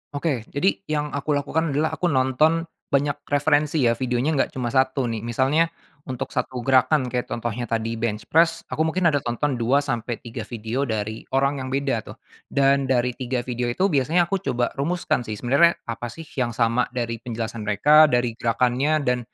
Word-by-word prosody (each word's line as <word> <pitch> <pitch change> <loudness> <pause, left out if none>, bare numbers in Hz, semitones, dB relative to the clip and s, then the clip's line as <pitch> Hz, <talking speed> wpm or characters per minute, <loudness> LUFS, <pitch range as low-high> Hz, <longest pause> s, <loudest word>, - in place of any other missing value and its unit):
Oke. 140 -6 -2
Jadi 180 +8 0
yang 150 -1 -1
aku 145 +1 -1
lakukan 155 +3 0
adalah 155 +2 +1
aku 180 - -1
nonton 150 +4 +2 0.2
banyak 145 +1 0
referensi 145 0 +2
ya. 115 - +4
Videonya 125 +4 0
nggak - - +1
cuma 120 -2 -2
1 130 0 +2
nih. 115 -2 -2
Misalnya 130 +8 +1 0.4
untuk 130 -2 -4
1 125 -2 -3
gerakan, 130 0 +3
kayak 125 -1 -2
contohnya 120 +1 -3
tadi 115 0 -2
bench 110 -2 -2
press, 165 +1 +3
aku - - -4
mungkin 170 0 +2
ada 145 - +1
tonton 125 +1 -2
2 135 +5 +2
sampai 120 -3 -2
3 115 -1 -7
video 120 +4 -3
dari 110 0 -4
orang 140 +1 +2
yang 130 - -5
beda 135 -3 0
tuh. - - -9 0.3
Dan 140 0 +2
dari 125 -1 +2
3 125 0 -3
video 125 -1 -3
itu 185 +11 +1
biasanya 155 +5 +3
aku 195 - +1
coba 125 -6 -1
rumuskan 150 -5 -1
sih, 110 - -3
sebenernya 140 +10 +3
apa 120 +1 -5
sih 160 +8 -9 0.2
yang 120 -3 -1
sama 115 +1 +2
dari 115 -2 -2
penjelasan 115 -1 -5
mereka, 150 +10 +6
dari 120 -3 +1
gerakannya 125 +6 +1
dan 125 -2 +1
130 Hz, 185 wpm, -23 LUFS, 120-145 Hz, 0.4 s, mereka